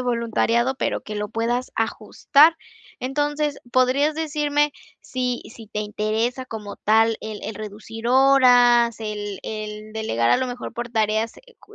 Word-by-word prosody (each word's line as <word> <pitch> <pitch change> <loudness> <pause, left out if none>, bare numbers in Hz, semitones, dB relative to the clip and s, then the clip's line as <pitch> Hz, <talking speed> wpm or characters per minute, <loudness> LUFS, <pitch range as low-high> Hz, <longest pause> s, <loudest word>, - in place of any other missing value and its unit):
voluntariado, 235 +1 +1
pero, - - -2
que 215 - -7
lo 210 0 -3
puedas 240 +4 -2
ajustar. 300 +7 +3 0.4
Entonces, 290 +2 -1
¿podrías 265 +5 +2
decirme, 295 -2 0 0.3
si 250 -1 -3
si 225 -3 -12
te 215 - -5
interesa 215 +4 -2
como 215 -4 -7
tal, 225 +1 +3
el 215 -1 -6
el 220 - -5
reducir 215 +2 -7
horas, 245 -3 +5
el 210 -2 -5
el 215 0 -6
delegar 120 - 0
a - - +5
lo 255 -1 -1
mejor 245 0 -6
por 240 0 -4
tareas, 220 0 0
eh 485 - -20
cu 430 - -18
235 Hz, 150 wpm, -23 LUFS, 215-260 Hz, 0.4 s, horas